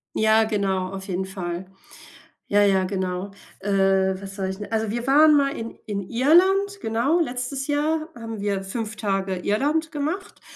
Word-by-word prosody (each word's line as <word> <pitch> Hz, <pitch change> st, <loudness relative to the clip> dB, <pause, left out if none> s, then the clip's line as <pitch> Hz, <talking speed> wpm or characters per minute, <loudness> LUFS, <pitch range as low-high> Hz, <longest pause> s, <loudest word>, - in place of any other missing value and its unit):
Ja 220 Hz, 0 st, +4 dB
genau, 195 Hz, -4 st, -1 dB
auf 190 Hz, 0 st, -7 dB
jeden 190 Hz, 0 st, -2 dB
Fall. 185 Hz, -2 st, -5 dB, 0.8 s
Ja, 205 Hz, 0 st, +4 dB
ja, 195 Hz, -2 st, +3 dB
genau. 185 Hz, 0 st, -3 dB, 0.3 s
Äh, 200 Hz, +1 st, -2 dB, 0.5 s
was 195 Hz, 0 st, -8 dB
wollte 190 Hz, -1 st, -2 dB
ich 190 Hz, -, -7 dB
denn? 210 Hz, -, -7 dB
Also, 220 Hz, -1 st, 0 dB
wir 240 Hz, +2 st, -3 dB
waren 300 Hz, +2 st, +6 dB
mal 275 Hz, 0 st, +1 dB
in 230 Hz, 0 st, -6 dB
in 205 Hz, -2 st, -3 dB
Irland, 380 Hz, +10 st, +3 dB
genau. 240 Hz, +10 st, +1 dB
Letztes 265 Hz, -1 st, -2 dB
Jahr 310 Hz, +2 st, 0 dB
haben 225 Hz, -5 st, -7 dB
wir 200 Hz, -1 st, -1 dB
5 215 Hz, +1 st, -4 dB
Tage 195 Hz, -3 st, -1 dB
Irland 290 Hz, -, 0 dB
gemacht 315 Hz, +7 st, -4 dB
220 Hz, 165 wpm, -24 LUFS, 195-285 Hz, 0.8 s, waren